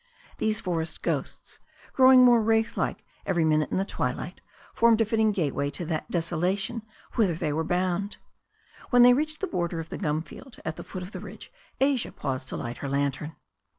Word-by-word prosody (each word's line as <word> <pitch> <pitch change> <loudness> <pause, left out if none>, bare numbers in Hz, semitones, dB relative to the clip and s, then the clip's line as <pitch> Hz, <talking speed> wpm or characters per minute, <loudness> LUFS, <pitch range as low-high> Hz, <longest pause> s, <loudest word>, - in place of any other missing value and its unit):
These 215 0 +1
for 175 -4 -1
est 160 - -6
ghosts, - - -3 0.3
growing 260 -1 +7
more 240 -2 +6
wraith 225 0 +1
like - - -2 0.2
every 175 -4 +1
minute 155 -1 +2
in - - -1
the 190 - +1
twilight, 155 +1 -3 0.3
formed 230 -1 +4
a 225 - +4
fitting 220 0 +2
gateway 145 -7 -1
to 175 - -5
that 160 -1 -3
desolation 180 +6 -1 0.3
whither 195 -8 +2
they 155 -2 -2
were 160 +2 0
bound. 180 +4 -1 0.7
When 245 -1 +6
they 245 0 +8
reached 305 +3 -1
the - - +1
border 170 - -2
of 165 0 -6
the - - -6
gum 155 -3 -1
field 235 - -12
at 155 - -3
the - - -8
foot 185 -2 -7
of 180 - -9
the - - -6
ridge - - -10 0.3
Asia 270 -2 +1
paused 130 -2 -4
to - - -4
light 120 -1 -5
her 140 - -4
lantern. 140 +2 -1
180 Hz, 195 wpm, -27 LUFS, 155-225 Hz, 0.7 s, they